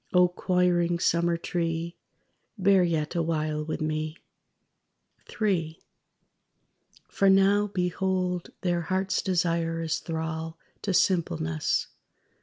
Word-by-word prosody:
(O 180 -1 +5
choiring 175 -1 +1
Summer 170 0 +2
tree, 170 0 -2 0.6
Bear 195 -1 +4
yet 160 -3 -1
awhile 155 -3 -1
with 155 +1 -4
me.) 155 +1 -2 1.1
III 170 -7 -1 1.3
For 195 - +2
now, 195 +2 +4
behold 180 -1 -1
their 175 -2 0
heart's 185 +3 0
desire 170 -2 0
is 160 - -1
thrall 160 0 -4 0.2
To 200 - -1
simpleness. 80 - +1
170 Hz, 95 wpm, -27 LUFS, 160-185 Hz, 1.3 s, O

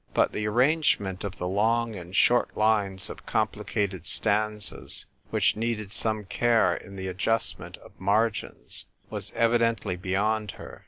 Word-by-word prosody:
But - - +3
the 105 0 -2
arrangement 120 - +2
of 100 -1 -5
the 90 - -3
long 115 +4 +1
and 90 0 -8
short 120 +4 +3
lines 105 -3 +2
of - - -10
complicated 95 -5 -1
stanzas, 105 0 +1 0.2
which - - +2
needed 110 -2 -2
some 110 -1 0
care 115 -2 +2
in 100 - -10
the 95 0 -5
adjustment 95 +5 -1
of - - -16
margins, 100 - 0 0.3
was - - -2
evidently 115 -4 +2
beyond 105 +4 -1
her. - - -11
105 Hz, 140 wpm, -27 LUFS, 95-115 Hz, 0.3 s, But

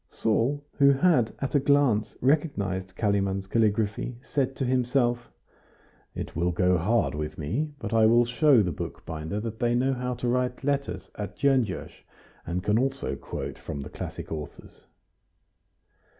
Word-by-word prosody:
Saul, 125 +7 0
who 140 0 +7
had 135 -6 +3
at 135 - -3
a 145 - +5
glance 140 -6 +2
recognized 100 - 0
Kalimann's 100 -2 0
calligraphy, 110 +2 0
said 135 -2 -1
to 135 - -2
himself: 125 -1 +1 0.9
"It - - -6
will 85 +2 +1
go 90 +1 +2
hard 105 +8 +1
with 75 +1 -4
me 110 - -2
but 115 -5 -5
I 110 -1 +5
will 120 +2 +5
show 125 -1 +4
the 90 - -1
bookbinder 80 +6 -5
that 110 0 -5
they 120 -1 +2
know 130 +2 +2
how 125 0 -3
to 120 0 -3
write 125 +1 0
letters 140 0 -2
at 105 -1 -6
Gyongos, 130 -8 +1 0.6
and 90 +1 -2
can 105 +3 +2
also 135 +1 -1
quote - - -6
from 70 - -6
the 70 - -7
classic - - -7
authors." 75 -2 -8
120 Hz, 150 wpm, -27 LUFS, 100-135 Hz, 0.9 s, who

